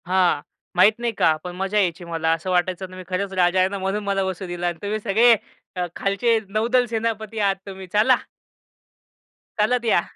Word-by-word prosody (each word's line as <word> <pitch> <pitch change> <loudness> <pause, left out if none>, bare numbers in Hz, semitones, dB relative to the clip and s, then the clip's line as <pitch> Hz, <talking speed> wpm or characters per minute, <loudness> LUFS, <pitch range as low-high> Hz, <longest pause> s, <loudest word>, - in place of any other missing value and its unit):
हां. 180 -5 +2 0.3
माहीत 205 +5 +5
नाही, 240 -1 -1
का? 160 -6 +3
पण 180 -1 -6
मजा 195 +3 -1
यायची 175 -3 0
मला. 165 -1 -1
असं 165 +3 -4
वाटायचं 180 +1 0
ना 185 - -11
मी 185 - -8
खरंच 190 +1 -2
राजा 180 0 +3
आहे 185 +1 +3
ना 200 - -4
म्हणून 195 +2 -2
मला 200 -1 0
बसू 190 0 -4
दिला 175 0 -3
आणि 175 -1 -2
तुम्ही 210 +1 -2
सगळे 225 +4 +5 0.4
अ, 180 -1 -1
खालचे 225 +4 +1
नौदल 235 +4 +2
सेनापती 225 -1 -3
आहात 200 -2 +2
तुम्ही. 190 -1 -8
चला. 220 +5 +5 1.4
चालत 240 +3 +2
या. 215 -6 +4
195 Hz, 190 wpm, -22 LUFS, 180-215 Hz, 1.4 s, माहीत